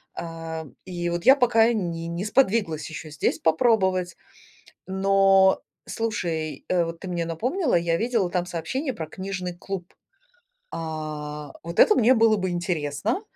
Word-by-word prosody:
Ам, 165 -2 -6
и 175 -2 -3
вот 175 0 -3
я 265 - +9
пока 240 -3 +4
не 170 -6 -3
не 170 +3 -4
сподвиглась 210 - +1
ещё 155 0 -8
здесь 150 -1 -1
попробовать. 185 0 +2 0.7
Но 195 0 +4 0.3
слушай, 170 -9 -3
э, 175 -2 +2
вот 165 0 -6
ты 190 - -6
мне 170 -2 -2
напомнила, 250 - 0
я 170 -1 +2
видела 225 -3 0
там 180 -1 0
сообщение 245 - -3
про 160 -6 -6
книжный 185 -1 -5
клуб. 185 -1 -6 0.8
А, 150 -2 -5
вот 170 +1 -5
это 425 - +7
мне 245 - +5
было 225 -2 +4
бы 185 -1 -1
интересно. 175 - -2
180 Hz, 145 wpm, -25 LUFS, 165-215 Hz, 0.8 s, я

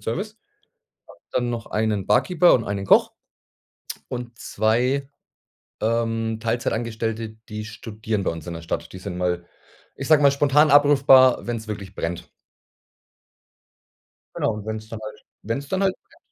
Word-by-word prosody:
Service, 195 - -4 0.7
habe - - -16
dann 120 -1 0
noch 115 -1 -4
einen 105 -3 -1
Barkeeper 180 -1 +4
und 115 - +1
einen 100 -1 -3
Koch - - +4 1.0
und 120 -2 -6
2, 125 +5 0 0.7
ähm, 115 0 0
Teilzeitangestellte, 115 -1 -2 0.2
die 105 0 -5
studieren 110 -1 -4
bei - - 0
uns 80 -1 -8
in 85 - -4
der 85 - -7
Stadt. 80 - -4
Die 95 - -8
sind 95 -1 -6
mal- 90 -1 -1 0.5
ich 135 - -5
sage 155 -2 +6
mal- 140 -1 +6
spontan 145 +2 +4
abrufbar, 140 -3 +6
wenn's 115 -2 -4
wirklich 100 -2 -6
brennt. 85 +1 -4 2.0
Genau - - 0
und 105 0 -8
wenn's 110 0 -5
dann 115 -1 -7
halt 110 0 -8 0.2
wenn's 125 +6 -4
dann 190 +4 -1
halt 190 -1 +2
brennt - - -25
115 Hz, 145 wpm, -23 LUFS, 105-135 Hz, 2.0 s, sage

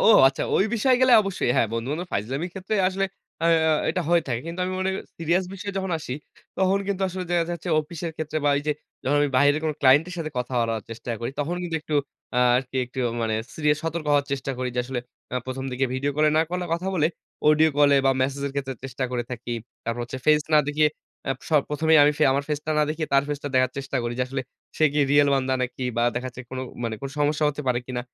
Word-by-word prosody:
ও - - +5 0.2
আচ্ছা 135 - -4
ওই 195 - +4
বিষয়ে 250 +3 +3
গেলে 255 -1 +5
অবশ্যই 195 -10 -1
হ্যাঁ, 115 - +3
বন্ধু-বান্ধব 140 +10 -3
ফাইজলামি 130 - -2
ক্ষেত্রে 190 +2 -3
আসলে 195 +1 -1 0.4
আ - - +3 0.2
আ - - +4 0.2
এটা - - -1
হয়ে 170 -1 +4
থাকে। 120 -3 -1
কিন্তু 170 +2 -5
আমি 185 - -2
মনে 190 0 +1
করি - - -3 0.2
serious 170 +3 +1
বিষয়ে 200 +1 -5
যখন 190 -1 -3
আসি, 135 -5 -5 0.4
তখন 190 +1 +3
কিন্তু 195 -1 -1
আসলে 185 0 -4
যে, - - 0
দেখা 170 -1 +3
যাচ্ছে 170 +1 -6
অফিসের 165 +2 -6
ক্ষেত্রে 155 0 -2
বা 145 - +4
ওই - - 0
যে, 150 - +3 0.3
যখন 145 +3 +2
আমি 145 - +3
বাইরের 145 +3 +4
কোন 155 - +1
client 140 +3 +6
এর 180 - -6
সাথে 155 -2 -3
কথা 125 +1 -3
বলার 115 -2 -1
চেষ্টা 115 +1 -6
করি, 120 - -2
তখন 155 +4 -1
কিন্তু 170 -2 -2
একটু 155 - -4 0.4
আ - - +4 0.2
আরকি 130 0 -3
একটু 125 +2 -10 0.2
মানে 110 -1 0 0.2
serious 150 -1 +2
সতর্ক 165 -1 -3
হওয়ার 145 -1 +3
চেষ্টা 135 0 -2
করি। 130 0 -1
যে, - - -2
আসলে 130 -1 -3 0.3
আ - - +1
১ম 130 +1 -4
দিকে 130 +2 0
video 140 +2 0
কলে 155 0 +4
না - - +6
কলে 180 0 -2
কথা 170 +3 -1
বলে 155 -4 +3 0.4
audio 155 +1 +6
কলে 145 -1 +6
বা - - +6
message 140 +1 -1
এর 140 - -4
ক্ষেত্রে 135 -1 -3
চেষ্টা 130 0 -3
করে 125 -1 -1
থাকি। 120 0 -5 0.3
তারপর 115 +1 -2
হচ্ছে 125 +2 -6
face 150 -1 +4
না - - +8
দেখিয়ে 150 +1 +3 0.4
আ - - +1 0.2
স - - -13 0.2
১ম 150 +2 -2
এই 160 - +8
আমি 145 - +6 0.2
আমার 140 +1 +1
face 150 0 -2
টা - - -1
না - - +5
দেখিয়ে 155 0 -2
তার 140 0 +5
face 145 -1 -3
টা 145 - -1
দেখার 130 0 +3
চেষ্টা 135 0 -3
করি 120 - -2
যে, - - +2
আসলে 135 0 -3 0.4
সে 155 - +4
কি 150 - 0
real 145 0 +5
বান্দা 130 -1 +1
নাকি 125 +1 -4
বা 120 - +2
দেখা 125 +1 -2
যাচ্ছে 125 0 -9
কোন 130 - -5 0.3
মানে 115 - -2
কোন 140 - -4
সমস্যা 150 +1 +2
হতে 150 0 -4
পারে 125 -1 +2
কিনা 125 -1 -3
145 Hz, 245 wpm, -25 LUFS, 130-165 Hz, 0.4 s, না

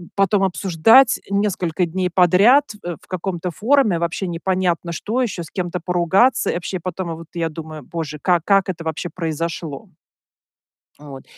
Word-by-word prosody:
потом 195 0 +2
обсуждать 195 +7 +4
несколько 185 -4 0
дней 180 +2 -2
подряд, 200 - +5 0.2
э, 175 -1 -4
в - - -22
каком-то 180 -1 -3
форуме 220 - +2
вообще 170 +3 -2
непонятно 175 0 -1
что 225 +9 -2
еще, 190 -7 -3
с 160 - -12
кем-то 180 -1 -3
поругаться. 185 +8 +2
И - - -3
вообще 180 +1 -4
потом 175 -1 -4
вот 165 -1 -11
я 165 -1 -2
думаю: 155 -1 -8
"Боже, 155 -1 -6
как 175 -3 +2
как 195 -2 +3
это 165 -2 -4
вообще 160 +2 -4
произошло?" 165 -3 -4 1.1
Вот. 140 -3 -10
175 Hz, 155 wpm, -20 LUFS, 165-195 Hz, 1.1 s, подряд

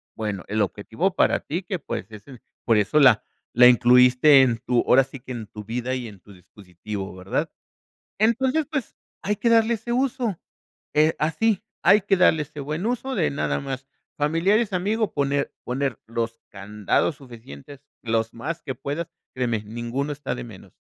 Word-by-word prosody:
Bueno, 105 -5 -4
el 105 +1 -1
objetivo 110 - -1
para - - +2
ti, 170 +6 -4
que, 185 0 -3
pues, - - -5
es 105 -1 -11
en 130 -4 -13 0.2
por 115 - +4
eso 105 +8 +2
la 125 -7 +6 0.3
la 125 +1 +8
incluiste 125 +3 +6
en 120 -3 +2
tu, 120 +1 0
ahora 135 +2 +6
sí 135 +1 -11
que 125 +1 -11
en 115 -3 -5
tu 105 +1 -10
vida 120 +4 -3
y 125 -2 -5
en 100 -3 -12
tu 100 - -16
dispositivo, 95 +2 -8
¿verdad? 95 +1 -3 0.7
Entonces, 255 +7 +2
pues, 275 -7 -3 0.3
hay 210 0 -1
que 235 - +1
darle 230 0 +4
ese 225 +2 -7
uso. 250 -6 -1 0.5
Eh, 155 +2 +3
así 205 +7 +1 0.2
hay 210 - +6
que 195 0 +2
darle 160 -4 +4
ese 150 0 -12
buen 150 +7 -4
uso 250 +3 -2
de 170 -7 +1
nada 140 - -1
más 135 -1 -6 0.3
familiares, 185 +9 +2
amigos, 205 +4 0
poner 140 0 0
poner 130 -1 -2
los 115 0 -3
candados 105 - -1
suficientes, 125 - -12 0.2
los 115 -1 -1
más 160 +8 -5
que 130 -3 -5
puedas, 145 +6 -4 0.3
créeme, 120 -4 -1
ninguno 120 +6 -4
está 145 -3 -4
de - - -6
menos, 110 -6 -13
135 Hz, 175 wpm, -24 LUFS, 115-180 Hz, 0.7 s, la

